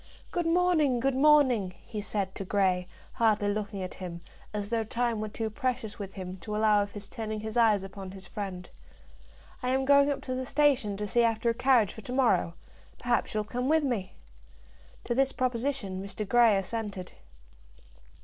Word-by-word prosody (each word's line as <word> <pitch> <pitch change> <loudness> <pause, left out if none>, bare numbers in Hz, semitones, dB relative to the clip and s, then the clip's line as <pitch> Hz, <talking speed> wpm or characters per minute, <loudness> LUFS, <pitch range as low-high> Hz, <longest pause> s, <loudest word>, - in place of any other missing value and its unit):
"Good 345 -1 -1
morning! 330 -7 +3
good 270 +3 +1
morning!" 260 -9 +4
he 210 - -5
said 200 -2 -2
to - - -5
Grey, 185 -2 +1 0.3
hardly 215 -3 +2
looking 205 -1 -3
at 185 - -6
him, 175 -2 -7 0.3
as 205 0 -4
though 230 -1 +1
time 235 0 -1
were 215 - -3
too 220 +1 -4
precious 225 -3 -3
with 195 -2 -7
him 185 -1 -6
to 210 +4 -6
allow 215 -1 +4
of 200 0 -4
his 205 -1 -7
turning 215 -1 -5
his 220 0 -5
eyes 220 -4 +4
upon 195 0 -8
his 190 0 -9
friend. 185 -3 -6 0.9
"I 250 - -1
am 265 +1 +1
going 280 +1 +5
up 285 - -2
to 255 - -3
the 255 0 -2
station 265 -7 +2
to 210 - -3
see 235 +4 +2
after 230 0 +2
a - - -2
carriage 250 -4 +3
for 220 - -10
to 245 +4 -6
morrow. 195 -10 +2 0.4
Perhaps 240 -2 0
you'll 215 - +1
come 245 +5 -3
with 315 0 +4
me." 235 -9 -2 0.9
To - - -1
this 270 +2 +2
proposition 250 -6 -2
Mr. 200 +1 -5
Grey 235 -2 +5
assented. 200 -2 -4
220 Hz, 185 wpm, -29 LUFS, 200-255 Hz, 0.9 s, going